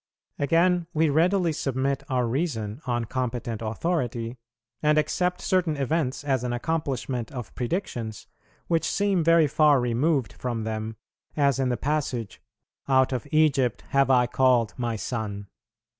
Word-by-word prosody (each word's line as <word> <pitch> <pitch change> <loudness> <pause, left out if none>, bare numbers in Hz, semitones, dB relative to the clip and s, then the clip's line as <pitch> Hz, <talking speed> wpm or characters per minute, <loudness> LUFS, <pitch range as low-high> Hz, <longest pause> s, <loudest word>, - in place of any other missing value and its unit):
Again, 170 +4 +2
we 155 -1 +3
readily 170 +2 +2
submit 135 -1 -1
our 125 -2 +1
reason 120 -3 -2
on 120 -1 0
competent 120 -2 -3
authority, 120 -1 -2 0.4
and 150 0 +3
accept 180 +4 0
certain 180 -5 +1
events 140 -1 -1
as 135 -4 0
an 125 -1 -2
accomplishment 130 -4 -2
of 125 -6 -7
predictions, 120 - -3 0.4
which 165 -1 +1
seem 200 -4 +1
very 165 0 +5
far 150 -1 +4
removed 125 -1 +1
from 120 -2 -3
them; 110 0 -4 0.4
as 140 -2 +3
in 130 -1 +1
the 125 - 0
passage, 135 -7 -2 0.5
"Out 130 -1 +3
of 125 +1 -3
Egypt 145 -6 +2
have 140 -1 +3
I 125 -2 +5
called 125 -2 +2
My 120 -2 -2
Son." 105 -3 -4
130 Hz, 140 wpm, -26 LUFS, 120-155 Hz, 0.5 s, very